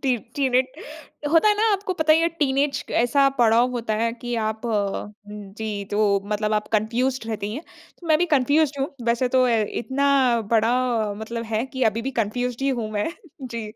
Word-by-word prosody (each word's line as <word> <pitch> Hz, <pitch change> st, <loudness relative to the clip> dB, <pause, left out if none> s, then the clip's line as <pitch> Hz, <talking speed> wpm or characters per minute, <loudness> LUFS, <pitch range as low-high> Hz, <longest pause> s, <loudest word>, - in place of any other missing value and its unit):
T 255 Hz, -3 st, +2 dB, 0.2 s
टीनेट 260 Hz, -2 st, +1 dB, 0.6 s
होता 335 Hz, +6 st, +5 dB
है 420 Hz, -, +4 dB
ना, 440 Hz, 0 st, +3 dB
आपको 390 Hz, -1 st, -1 dB
पता 315 Hz, -2 st, +3 dB
ही 320 Hz, -, +4 dB
है, 335 Hz, -, +2 dB
टीनेज 280 Hz, -3 st, 0 dB
क -, -, -12 dB
ऐसा 275 Hz, +3 st, +3 dB
पड़ाव 235 Hz, +2 st, +4 dB
होता 230 Hz, -3 st, -2 dB
है 230 Hz, 0 st, +1 dB
कि 240 Hz, 0 st, -5 dB
आप 220 Hz, +1 st, -6 dB
उम, 210 Hz, -1 st, -2 dB, 0.5 s
जी, 210 Hz, -2 st, -4 dB
तो 205 Hz, -1 st, +2 dB
मतलब 210 Hz, +1 st, -1 dB
आप 210 Hz, 0 st, -1 dB
कन्फ्यूज़्ड 235 Hz, +3 st, 0 dB
रहती 210 Hz, -1 st, -3 dB
हैं। 300 Hz, -, -6 dB, 0.4 s
तो 345 Hz, -, -11 dB
मैं 310 Hz, -1 st, +4 dB
भी 355 Hz, -, +2 dB
कन्फ्यूज़्ड 285 Hz, +1 st, +2 dB
हूँ। 275 Hz, -, 0 dB, 0.2 s
वैसे 235 Hz, +2 st, +1 dB
तो 255 Hz, 0 st, +3 dB
अ, 250 Hz, -, +2 dB
इतना 255 Hz, +3 st, +1 dB
बड़ा 225 Hz, +1 st, +3 dB, 0.5 s
मतलब 230 Hz, +1 st, -5 dB
है 220 Hz, -, +1 dB
कि 260 Hz, -1 st, -3 dB
अभी 225 Hz, +2 st, -5 dB
भी 270 Hz, -, -2 dB
कन्फ्यूज़्ड 245 Hz, +4 st, -2 dB
ही 275 Hz, -, +1 dB
हूँ 235 Hz, -5 st, -2 dB
मैं। 210 Hz, +10 st, -1 dB, 0.3 s
जी। 230 Hz, -4 st, -5 dB
245 Hz, 195 wpm, -23 LUFS, 220-275 Hz, 0.6 s, होता